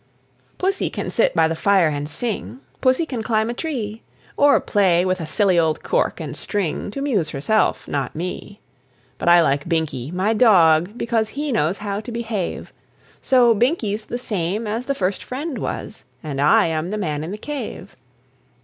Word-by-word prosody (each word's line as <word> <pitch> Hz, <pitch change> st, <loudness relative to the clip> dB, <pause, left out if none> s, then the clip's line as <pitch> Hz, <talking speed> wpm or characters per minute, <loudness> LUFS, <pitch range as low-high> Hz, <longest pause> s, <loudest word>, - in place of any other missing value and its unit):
Pussy 385 Hz, +1 st, 0 dB
can -, -, -4 dB
sit -, -, +2 dB
by -, -, +4 dB
the 165 Hz, -, -2 dB
fire 195 Hz, -1 st, +3 dB
and 145 Hz, 0 st, -3 dB
sing, 230 Hz, -, -4 dB, 0.2 s
Pussy 260 Hz, +5 st, +3 dB
can 250 Hz, -7 st, -4 dB
climb 220 Hz, 0 st, 0 dB
a -, -, -3 dB
tree, 235 Hz, -7 st, -4 dB, 0.3 s
Or 285 Hz, 0 st, +5 dB
play 185 Hz, -4 st, +2 dB
with 185 Hz, -1 st, 0 dB
a 160 Hz, -, -5 dB
silly 185 Hz, +1 st, +3 dB
old 160 Hz, -2 st, 0 dB
cork -, -, 0 dB
and -, -, -5 dB
string 200 Hz, -3 st, -2 dB
To 275 Hz, +7 st, -5 dB
'muse 205 Hz, -, 0 dB
herself, 150 Hz, +11 st, 0 dB
not 140 Hz, -3 st, -3 dB
me. 180 Hz, +4 st, -6 dB, 0.6 s
But -, -, +1 dB
I 175 Hz, 0 st, +7 dB
like 145 Hz, +2 st, 0 dB
Binkie, 155 Hz, -6 st, -1 dB
my 190 Hz, +5 st, +1 dB
dog, 185 Hz, -4 st, +4 dB
because 225 Hz, -2 st, 0 dB
He 290 Hz, +4 st, -3 dB
knows 185 Hz, -5 st, +1 dB
how 205 Hz, -1 st, -3 dB
to 240 Hz, -, -8 dB
behave; 225 Hz, -5 st, -4 dB, 0.5 s
So, 245 Hz, -3 st, +5 dB
Binkie's 220 Hz, -3 st, 0 dB
the 240 Hz, -, -4 dB
same 205 Hz, -2 st, -2 dB
as 225 Hz, +4 st, -3 dB
the 275 Hz, -, 0 dB
First 190 Hz, -4 st, -1 dB
Friend 280 Hz, +4 st, -5 dB
was, 210 Hz, -, -5 dB, 0.2 s
And 140 Hz, -3 st, -3 dB
I 145 Hz, -, +5 dB
am 160 Hz, +1 st, -2 dB
the 215 Hz, -, -3 dB
Man 155 Hz, -7 st, -2 dB
in 160 Hz, -, -5 dB
the 205 Hz, -, -5 dB
Cave. 245 Hz, -6 st, -6 dB
205 Hz, 180 wpm, -21 LUFS, 165-235 Hz, 0.6 s, I